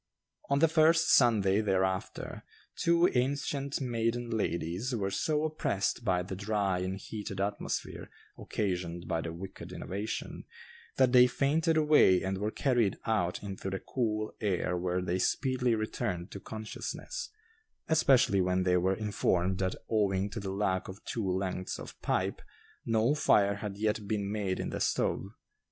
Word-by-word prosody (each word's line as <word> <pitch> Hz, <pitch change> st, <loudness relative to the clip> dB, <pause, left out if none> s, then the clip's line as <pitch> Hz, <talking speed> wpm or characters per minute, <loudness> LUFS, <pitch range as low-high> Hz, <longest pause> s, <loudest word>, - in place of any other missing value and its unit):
On 140 Hz, -, +3 dB
the 165 Hz, +3 st, +5 dB
first 160 Hz, +1 st, +4 dB
Sunday 105 Hz, -5 st, +4 dB
thereafter, 95 Hz, -2 st, -1 dB, 0.3 s
two 170 Hz, +1 st, +4 dB
ancient 140 Hz, +2 st, -1 dB
maiden 120 Hz, -2 st, -1 dB
ladies 100 Hz, +3 st, -1 dB
were 100 Hz, -3 st, -1 dB
so 150 Hz, +8 st, 0 dB
oppressed 150 Hz, -11 st, -1 dB
by 90 Hz, -1 st, +1 dB
the 95 Hz, +1 st, -6 dB
dry 100 Hz, -2 st, 0 dB
and 95 Hz, +1 st, -3 dB
heated 100 Hz, -1 st, -6 dB
atmosphere 100 Hz, +1 st, -3 dB, 0.3 s
occasioned 90 Hz, -4 st, -3 dB
by 80 Hz, -, 0 dB
the 80 Hz, -, -4 dB
wicked 95 Hz, +3 st, -8 dB
innovation, 105 Hz, +4 st, -5 dB, 0.5 s
that 130 Hz, -2 st, +4 dB
they 125 Hz, 0 st, +8 dB
fainted 155 Hz, +6 st, +1 dB
away 150 Hz, -, +5 dB
and 95 Hz, 0 st, -2 dB
were 105 Hz, +1 st, 0 dB
carried 120 Hz, -4 st, +1 dB
out 95 Hz, -6 st, 0 dB
into 95 Hz, -1 st, -5 dB
the 95 Hz, 0 st, -3 dB
cool 110 Hz, -3 st, -2 dB
air 95 Hz, -3 st, 0 dB
where 90 Hz, +1 st, -1 dB
they 90 Hz, 0 st, -1 dB
speedily 125 Hz, +2 st, +1 dB
returned 110 Hz, -5 st, -3 dB
to 100 Hz, -, -7 dB
consciousness, 110 Hz, -, -6 dB, 0.6 s
especially 130 Hz, -10 st, +4 dB
when 90 Hz, 0 st, +1 dB
they 90 Hz, 0 st, +3 dB
were 95 Hz, +2 st, +2 dB
informed 95 Hz, -3 st, 0 dB
that 95 Hz, -1 st, 0 dB
owing 100 Hz, -2 st, +1 dB
to 115 Hz, -, -4 dB
the 100 Hz, -1 st, -5 dB
lack 95 Hz, -2 st, 0 dB
of 95 Hz, +2 st, -10 dB
two 110 Hz, -5 st, -2 dB
lengths 95 Hz, 0 st, -2 dB
of -, -, -10 dB
pipe, -, -, -1 dB, 0.5 s
no 115 Hz, +4 st, +3 dB
fire 100 Hz, -9 st, +3 dB
had 100 Hz, -1 st, -5 dB
yet 105 Hz, -1 st, -1 dB
been 100 Hz, -1 st, -1 dB
made 100 Hz, -3 st, -1 dB
in -, -, -3 dB
the -, -, -3 dB
stove. -, -, 0 dB
105 Hz, 150 wpm, -30 LUFS, 95-120 Hz, 0.6 s, they